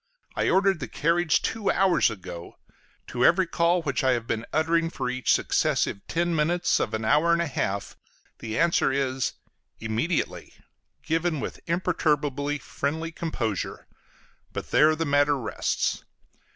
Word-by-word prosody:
I - - +1
ordered 195 -2 +3
the - - -4
carriage 165 +1 +1
two 220 -3 -1
hours 190 -6 +3
ago: 90 -5 -9 0.5
to 125 0 -2
every 180 +7 +5
call 170 +1 +1
which 140 -2 -1
I 130 -1 +4
have 120 -2 -2
been 115 -1 -3
uttering 165 +1 +1
for 130 -6 -3
each 130 0 0
successive 100 - +1
ten 175 0 0
minutes 170 +3 +1
of - - -1
an 110 0 -3
hour 150 +9 +3
and 170 - +2
a 170 - +1
half, 100 -9 -3 0.4
the 110 0 -4
answer 170 -4 +3
is, 135 -1 -1 0.5
"Immediately," 115 +10 -2 0.5
given 165 0 0
with - - -5
imperturbably 150 -5 0
friendly 160 +4 -3
composure; 120 - -3 0.7
but - - -6
there 155 +1 +5
the 165 +1 -2
matter 145 0 +3
rests. 120 - -2
150 Hz, 145 wpm, -26 LUFS, 130-170 Hz, 0.7 s, every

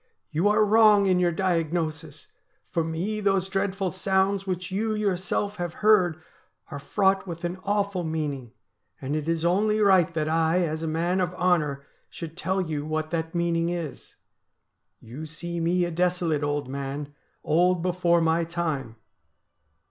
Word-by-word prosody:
'You 170 +6 +1
are 210 +1 +4
wrong 210 -1 +5
in 185 -2 +3
your 175 -1 +2
diagnosis; 165 -3 -2 0.5
for 165 - +1
me 175 +7 -3
those 195 -2 +1
dreadful 195 -1 -1
sounds 190 +1 0
which 185 0 -3
you 215 +3 -1
yourself 200 0 -1
have 175 -2 -4
heard 180 -6 +4 0.5
are 140 - -5
fraught 195 +5 +1
with 170 0 -7
an 175 +2 -3
awful 200 -2 0
meaning, 150 -7 -3 0.5
and 135 +3 -3
it 155 +1 -2
is 165 0 0
only 210 +5 +2
right 190 -5 +4
that 155 -1 0
I, 165 +2 +2
as 160 0 -3
a 165 - -2
man 170 +4 0
of 180 0 -2
honour, 155 -6 +1 0.2
should 165 -1 -8
tell 190 +2 -1
you 155 -5 -3
what 155 +1 -3
that 165 0 -3
meaning 170 -1 +1
is. 170 -5 -6 0.8
You 130 +8 -9
see 170 +2 -5
me 175 +2 +1
a 175 - -4
desolate 175 -3 0
old 145 -1 -1
man 140 +2 -5
— - - -43
old 175 +2 +2
before 175 -1 +2
my 165 +1 +2
time. 160 -8 -3
175 Hz, 160 wpm, -26 LUFS, 160-190 Hz, 0.8 s, wrong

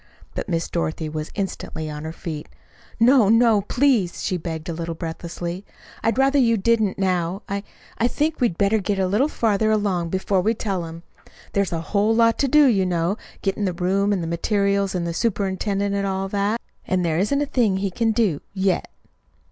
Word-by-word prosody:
But - - -4
Miss 165 -1 0
Dorothy 160 -2 -2
was 155 0 -4
instantly 190 -5 -4
on 150 0 -6
her 160 - -4
feet. 160 -3 -6 0.5
"No, 235 -2 +5
no, 225 -2 +5
please," 230 -4 +1
she 185 - 0
begged 160 -2 -5
a 170 - -2
little 165 0 -4
breathlessly. 170 +2 -5 0.4
"I'd 225 - +1
rather 275 +1 +4
you 230 -3 +4
didn't 220 -1 +1
now. 185 0 0
I 200 0 -2 0.4
I 235 - +3
think 300 +3 -1
we'd 230 -9 +1
better 205 +2 +3
get 200 0 -1
it 190 - +1
a - - +1
little 210 +10 +2
farther 220 -6 +1
along 200 -6 +1
before 190 +1 +1
we 220 +5 +1
tell 195 -6 -2
him. 165 +1 -9 0.5
There's 200 -1 +1
a 165 -1 -2
whole 210 +5 +1
lot 230 0 +3
to 280 - +2
do, 300 +2 +6
you 210 -8 +3
know 175 +1 0 0.3
getting 200 +1 0
the 185 - 0
room 195 +3 +1
and 190 -4 0
the - - -3
materials 200 +3 0
and 175 -1 -1
the 170 - -2
superintendent, 200 0 -1
and 200 0 0
all 190 0 -1
that; 205 +3 0 0.3
and 185 -1 +1
there 160 0 +1
isn't 245 +9 +1
a 290 - +1
thing 230 -8 +1
he 195 0 -1
can 225 +4 +1
do 215 -10 +1
yet." 190 -1 0
195 Hz, 200 wpm, -23 LUFS, 175-220 Hz, 0.5 s, do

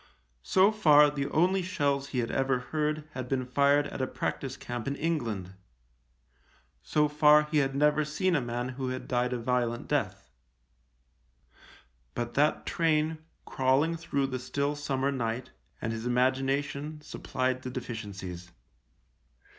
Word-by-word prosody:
So 190 - +4
far 150 -9 +6
the 140 -1 -3
only 180 +6 +2
shells 140 -6 0
he 135 - -5
had 120 -2 0
ever 135 -1 +1
heard 150 +3 -2
had 130 -3 -6
been 130 -2 0
fired 140 +3 +3
at 135 - -5
a 130 - 0
practice 135 +1 -4
camp 120 -1 -5
in 140 - -1
England; 115 - -2 1.3
so 150 0 +2
far 150 0 +5
he 150 0 0
had 135 -1 0
never 150 +1 +3
seen 170 +4 0
a 145 - +2
man 120 +1 -3
who 130 0 -4
had 130 0 -5
died 125 0 0
a 125 - -1
violent 120 -1 -1
death; - - -2 1.8
but 120 0 -3
that 150 +4 +2
train, 160 -1 +1 0.3
crawling 135 +5 +2
through 150 -4 -1
the 130 -1 -3
still 140 +3 -2
summer 140 -2 -1
night, 125 -1 -3 0.3
and 115 - -2
his 115 +1 -4
imagination 135 +4 0
supplied 130 -3 -2
the 130 - -5
deficiencies. 100 -8 -6
135 Hz, 145 wpm, -29 LUFS, 125-150 Hz, 1.8 s, far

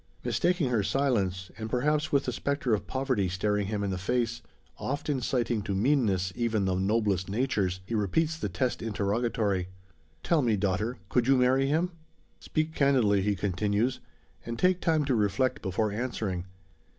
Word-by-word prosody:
Mistaking 175 -7 +1
her 115 -3 +2
silence, 100 -7 0
and 110 0 -4
perhaps 150 +5 +1
with 140 -1 +2
the - - -1
spectre 140 -4 -1
of 105 - -1
poverty 130 -8 0
staring 105 +2 0
him 105 -1 -2
in 100 - -1
the 95 - -3
face 115 +4 -1 0.4
oft 145 +3 -3
inciting 125 -4 0
to 100 -1 -3
meanness, 100 -6 +2
even 115 -4 0
the 95 - +1
noblest 95 -1 +1
natures 100 -5 0
he 115 - -6
repeats 150 - +1
the 155 -10 -3
test 120 +8 -1
interrogatory: 105 -2 0 0.6
"Tell 165 -3 +3
me, 115 -5 +2
daughter! 105 +5 -1
Could 120 +4 +1
you 135 0 +5
marry 130 +2 +3
him?" 165 +5 +1 0.5
"Speak 155 0 -2
candidly," 125 -10 +3
he 100 +1 +1
continues, 105 +6 0 0.4
"and 115 0 -5
take 185 +3 +2
time 160 -3 +2
to 135 - +1
reflect 110 +3 +1
before 105 +2 -1
answering. 105 -5 -3
115 Hz, 165 wpm, -28 LUFS, 100-135 Hz, 0.6 s, you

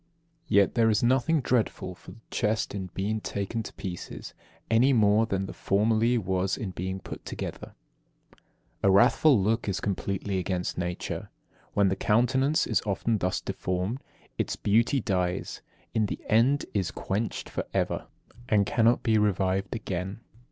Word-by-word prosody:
Yet 100 -1 +4
there 115 -2 +3
is 105 +1 +2
nothing 135 +6 +3
dreadful 115 -6 0
for - - -13
the 115 - -17
chest 110 +1 0
in 95 -2 -4
being 105 +3 -1
taken 100 +4 -3
to 110 - -8
pieces, 95 -3 -7 0.3
any 120 +5 +4
more 110 -1 +4
than 95 -2 -1
there - - -7
formerly 110 +4 +2
was 95 -2 0
in 100 -4 -4
being 95 +1 -4
put - - -9
together. - - -6 1.0
24. 100 - +3
A - - +6
wrathful 130 +6 +5
look 110 +2 0
is 95 - -1
completely 100 0 -2
against 90 0 -2
nature. 90 0 -4 0.5
When 100 -1 +4
the 95 - 0
countenance 130 +9 +2
is 110 - +1
often 105 +2 0
thus 90 0 -1
deformed, 90 +8 -3 0.4
its - - 0
beauty 115 +6 +2
dies, 90 -4 -2 0.3
in 110 -2 +2
the - - -4
end 125 +6 +3
is 95 -4 0
quenched 105 +3 -3
for - - -4
ever, - - -1 0.4
and 105 -2 +4
cannot 115 +2 +3
be 110 -2 +3
revived 95 0 0
again. 95 0 -4
105 Hz, 155 wpm, -27 LUFS, 95-115 Hz, 1.0 s, A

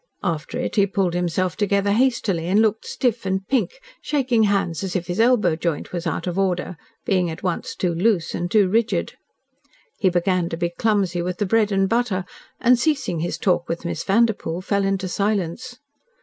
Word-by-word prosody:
After 165 -5 -2
it - - -3
he 200 -1 +4
pulled 190 -3 0
himself 180 0 -1
together 200 -1 +1
hastily, 210 -7 +1
and 195 +4 +3
looked 220 0 +1
stiff 245 -3 -1
and 190 0 -2
pink, 275 - 0 0.2
shaking 260 -6 +1
hands 195 -4 0
as 190 -2 -4
if 180 -2 -1
his 175 +4 -4
elbow 225 -8 +4
joint 165 0 -3
was 175 -1 -3
out 165 - -2
of 180 +1 -2
order, 185 -1 -1 0.3
being 185 -3 +1
at 160 +3 -7
once 180 -3 -2
too 180 -2 -1
loose 185 0 +1
and 175 0 -2
too 205 -1 +4
rigid. 225 +4 0 0.9
He 195 - +3
began 180 0 +1
to 165 - -4
be 170 0 -1
clumsy 190 -2 0
with 180 +1 -3
the 205 - 0
bread 215 +1 +2
and 195 -1 +2
butter, 210 -4 0 0.3
and, 250 -1 +4
ceasing 275 - 0
his 170 +2 -2
talk 175 -2 0
with 165 +1 -4
Miss 170 -2 -3
Vanderpoel, 200 -5 +1
fell 200 +1 0
into 195 -1 -1
silence. 205 +5 -2
190 Hz, 190 wpm, -22 LUFS, 175-215 Hz, 0.9 s, he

